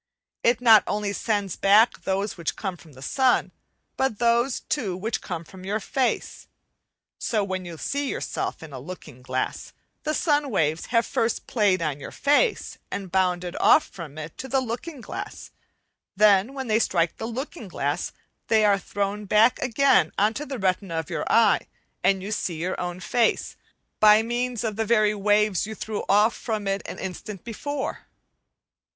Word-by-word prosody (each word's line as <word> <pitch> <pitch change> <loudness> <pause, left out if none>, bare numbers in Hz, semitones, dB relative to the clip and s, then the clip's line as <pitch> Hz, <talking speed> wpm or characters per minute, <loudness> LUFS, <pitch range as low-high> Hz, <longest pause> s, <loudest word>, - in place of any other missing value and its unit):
It 235 0 +3
not 225 -3 +7
only 205 -1 -1
sends 205 -4 -1
back 210 +4 +4
those 195 +2 -1
which 170 -3 -3
come 190 -3 -4
from 155 -2 -17
the 130 +1 -12
sun, 260 - +2 0.5
but 265 -5 0
those, 235 +3 +2
too, 200 -11 -2
which 220 +4 -2
come 175 -3 -5
from 185 +3 -13
your 205 +3 -1
face. 255 +4 -2 0.7
So, 215 -3 0
when 190 -2 -3
you 170 -2 -8
see 280 - -2
yourself - - -3
in 155 -3 -10
a 130 - -6
looking 150 -3 -10
glass, 130 0 -3 0.3
the 305 0 -1
sun 295 -3 +1
waves 160 - 0
have 230 -1 +2
first 230 0 -1
played 200 -6 +2
on 145 -3 -2
your - - -7
face 295 - +1
and 190 -3 -5
bounded 180 -1 0
off - - +6
from 155 -5 -9
it 155 +1 -7
to 265 - -5
the 265 +1 +2
looking 255 +4 -5
glass; - - -7 0.6
then, 210 +4 +4
when 265 -1 -4
they 220 -2 +2
strike 170 -6 +1
the 225 - -4
looking 255 - -6
glass, 145 -5 -2 0.4
they 220 -1 +4
are 200 -1 +4
thrown 205 +1 -3
back 215 +4 +4
again 270 +2 +3
on 210 +2 +3
to 295 +6 -5
the 270 -1 -4
retina 190 -3 -1
of 160 -2 -4
your - - -2
eye, - - +4 0.4
and 195 -1 +2
you 205 - -5
see 185 -5 -2
your 180 +3 -2
own 175 0 -4
face 230 +5 0 0.4
by 215 +1 +7
means 240 0 -2
of 215 -2 -2
the 225 - +1
very 215 -1 +3
waves 210 -1 +2
you 220 - -6
threw 215 -1 -4
off 210 +3 +4
from 215 -3 -3
it 195 0 0
an - - -6
instant 190 +1 -6
before. 270 +5 -4
210 Hz, 175 wpm, -25 LUFS, 185-235 Hz, 0.7 s, not